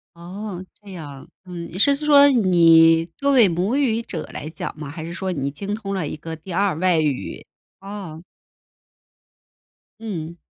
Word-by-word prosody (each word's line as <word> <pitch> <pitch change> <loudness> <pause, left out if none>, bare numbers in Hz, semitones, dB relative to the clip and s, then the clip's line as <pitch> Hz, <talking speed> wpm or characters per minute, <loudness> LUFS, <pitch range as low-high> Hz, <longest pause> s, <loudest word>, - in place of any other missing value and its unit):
哦， 185 +2 -7 0.2
这 205 -2 -12
样。 145 -6 -9 0.2
嗯， 175 -2 -7
你 175 - -7
是 280 +8 +4
说， 285 -1 +6
你 165 -8 +5
作 280 0 +1
为 245 -6 +6
母 185 +7 -1
语 245 -6 +1
者 170 -8 -6
来 155 - -6
讲 160 - -6
吗？ 150 -2 -7
还 160 +2 -7
是 170 - -7
说 190 +1 -3
你 140 -5 -2
精 200 +8 -5
通 200 -2 -5
了 185 -6 -2
一 - - -5
个 160 +1 -7
第 165 +4 -11
2 195 -1 +1
外 180 -1 +2
语。 150 -4 -3 0.3
啊。 195 -5 -8 1.8
嗯。 170 -7 -6
180 Hz, 170 characters per minute, -22 LUFS, 165-205 Hz, 1.8 s, 说